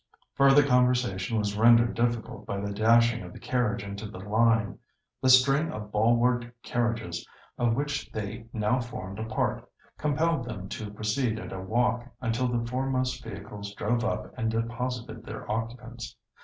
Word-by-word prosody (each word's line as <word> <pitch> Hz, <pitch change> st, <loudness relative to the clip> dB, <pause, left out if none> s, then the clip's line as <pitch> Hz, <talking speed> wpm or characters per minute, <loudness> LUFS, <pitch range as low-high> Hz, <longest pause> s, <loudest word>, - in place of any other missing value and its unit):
Further 140 Hz, +1 st, +6 dB
conversation 125 Hz, -6 st, +2 dB
was 105 Hz, -1 st, 0 dB
rendered 115 Hz, +2 st, +6 dB
difficult 115 Hz, -2 st, -2 dB
by 100 Hz, -, -2 dB
the 100 Hz, 0 st, -3 dB
dashing 115 Hz, +2 st, +4 dB
of 90 Hz, -1 st, -9 dB
the -, -, -10 dB
carriage 125 Hz, -5 st, 0 dB
into 100 Hz, +2 st, -6 dB
the 105 Hz, -, -9 dB
"line." 110 Hz, +1 st, +2 dB, 0.4 s
The 130 Hz, -, +3 dB
string 135 Hz, +5 st, +5 dB
of 105 Hz, -1 st, -7 dB
ball 110 Hz, +3 st, +4 dB
ward 120 Hz, 0 st, +1 dB
carriages, 115 Hz, -8 st, -1 dB, 0.4 s
of 120 Hz, -2 st, +2 dB
which 145 Hz, +1 st, -2 dB
they 110 Hz, +2 st, -5 dB
now 110 Hz, +3 st, +1 dB
formed 105 Hz, -5 st, -6 dB
a 110 Hz, -, -3 dB
part, 110 Hz, -, -1 dB, 0.4 s
compelled 150 Hz, -1 st, +1 dB
them 100 Hz, -6 st, -6 dB
to 105 Hz, -1 st, -5 dB
proceed 110 Hz, +3 st, -1 dB
at -, -, -7 dB
a 95 Hz, -, -5 dB
walk 120 Hz, +4 st, 0 dB
until 125 Hz, +1 st, 0 dB
the 120 Hz, -1 st, -1 dB
foremost 130 Hz, 0 st, -1 dB
vehicles 100 Hz, +1 st, -8 dB
drove 120 Hz, +4 st, 0 dB
up 110 Hz, -2 st, -2 dB
and 115 Hz, -3 st, -1 dB
deposited 115 Hz, 0 st, -3 dB
their -, -, -8 dB
occupants. 115 Hz, +2 st, -5 dB
115 Hz, 160 wpm, -28 LUFS, 105-125 Hz, 0.4 s, Further